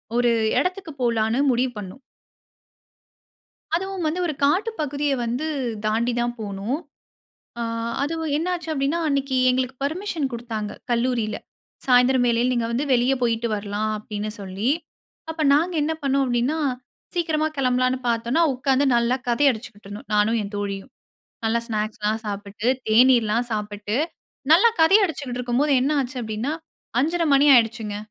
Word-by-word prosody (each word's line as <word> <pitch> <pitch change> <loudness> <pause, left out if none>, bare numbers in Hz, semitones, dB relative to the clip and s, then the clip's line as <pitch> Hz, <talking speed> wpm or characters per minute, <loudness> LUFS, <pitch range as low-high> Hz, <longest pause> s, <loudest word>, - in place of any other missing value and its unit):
ஒரு 240 0 +3 0.3
இடத்துக்கு 365 +1 -2
போலான்னு 230 +1 +1
முடிவு 250 +1 +1
பண்ணோம். 195 +4 -8 1.8
அதுவும் 385 -1 -3
வந்து 345 +4 -2
ஒரு 310 - -2
காட்டு 375 +11 +2
பகுதிய 290 0 -1
வந்து 245 +7 -2 0.4
தாண்டி 230 +3 +1
தான் 240 0 -1
போணும். 210 +6 -3 0.8
அ - - -2 0.4
அதுவும் 320 0 -2
என்ன 330 - -2
ஆச்சு 340 -2 -5
அப்படின்னா 280 +4 0
அன்னைக்கு 275 -2 0
எங்களுக்கு 255 0 0
பெர்மிஷன் 320 -1 -2
குடுத்தாங்க 225 -3 -4 0.2
கல்லூரில. 235 -3 0 0.5
சாயந்திரம் 250 0 +4
வேளையில 240 +2 +2
நீங்க 235 -2 0
வந்து 255 +5 -1
வெளியே 250 +2 +3
போயிட்டு 235 -1 +1
வரலாம் 205 +1 -2
அப்படின்னு 210 0 -5
சொல்லி. 195 +5 -2 0.6
அப்ப 320 0 -4
நாங்க 335 +5 +2
என்ன 315 +2 0
பண்ணோம் 275 0 +2
அப்படின்னா 250 +5 0 0.6
சீக்கிரமா 315 -3 +1
கிளம்பலான்னு 255 0 +1
பார்த்தோம்னா 235 +7 +1
உட்காந்து 265 +2 +1
நல்லா 235 +2 +2
கதை 240 +4 +2
அடிச்சுக்கிட்டு 220 -3 -10
இருந்தோம். 205 0 -9
நானும் 215 +2 +3
என் 205 0 -7
தோழியும், 200 -1 -4 0.5
நல்லா 230 +1 +1
ஸ்நாக்ஸ்லாம் 215 -1 -2
சாப்பிட்டு, 205 +2 -5 0.2
தேநீர்லாம் 235 0 +4
சாப்பிட்டு 210 +1 -3 0.6
நல்லா 390 +9 +7
கதை 355 +6 +7
அடிச்சுக்கிட்டு 270 -7 -4
இருக்கும்போது 250 +4 +1
என்ன 270 +4 +1
ஆச்சு 260 0 -4
அப்படின்னா 220 +5 -3 0.5
5:30 335 +5 +1
மணி 280 +2 +5
ஆயிடுச்சுங்க. 225 -3 +1
245 Hz, 135 wpm, -23 LUFS, 220-285 Hz, 1.8 s, நல்லா